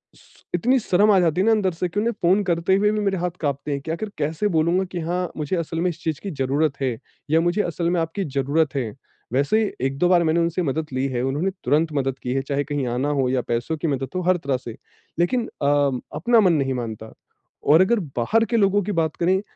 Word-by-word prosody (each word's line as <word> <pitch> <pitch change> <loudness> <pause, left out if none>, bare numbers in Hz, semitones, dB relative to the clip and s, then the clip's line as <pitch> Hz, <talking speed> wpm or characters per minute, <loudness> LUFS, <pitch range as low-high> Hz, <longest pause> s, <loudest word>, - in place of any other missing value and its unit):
श - - -23
इतनी 250 +9 +3
शर्म 210 0 +3
आ 195 - +5
जाती 175 +1 +2
है - - +2
ना 225 - +4
अंदर 200 -4 +2
से 180 +2 -2
कि 205 +4 -2
उन्हें 230 +2 0
फ़ोन 190 +4 +3
करते 175 +1 +1
हुए 210 +1 +3
भी 215 - -1
मेरे 195 -2 0
हाथ 175 0 -1
काँपते 145 0 -2
है 140 - -2
कि 160 +4 -6
आखिर 205 +5 -4
कैसे 160 +8 0
बोलूँगा 170 +4 +2
कि 175 - -3
हाँ 175 +2 -2
मुझे 155 +4 -2
असल 165 0 -3
में 180 - +2
इस 170 -1 -7
चीज 160 -3 -2
की 200 - -6
ज़रूरत 140 +2 0
है 125 -4 -1 0.3
या 165 +1 +4
मुझे 175 +5 +1
असल 170 0 -2
में 175 -1 +1
आपकी 165 +5 -3
ज़रूरत 140 +2 0
है। 120 -6 -2 0.4
वैसे 145 +12 +2
ही 205 - -2 0.2
1-2 140 +6 0
बार 175 -2 +5
मैंने 160 +1 +2
उनसे 170 +2 0
मदद 155 +2 -2
ली 130 +1 0
है, 125 -2 -2
उन्होंने 150 +9 0
तुरंत 155 +2 +2
मदद 135 -2 -1
की 125 0 -2
है। 135 - 0
चाहे 140 +1 -1
कहीं 145 -3 -2
आना 135 +4 0
हो 130 - +2
या 130 -1 +1
पैसों 120 +8 -2
की 160 - -2
मदद 135 -2 -1
हो, 185 - 0
हर 180 0 +2
तरह 140 -5 -1
से। 120 -3 -9 0.4
लेकिन 230 +7 +1
अ, - - 0 0.5
अपना 230 +9 +3
मन 180 -4 +4
नहीं 135 -3 +1
मानता। 110 -3 -6 0.5
और 160 +4 +6
अगर 225 +4 +3 0.2
बाहर 225 - +2
के 235 - 0
लोगों 205 0 +3
की 210 - -3
बात 160 -3 0
करें 185 +3 +2
165 Hz, 245 wpm, -23 LUFS, 140-185 Hz, 0.5 s, और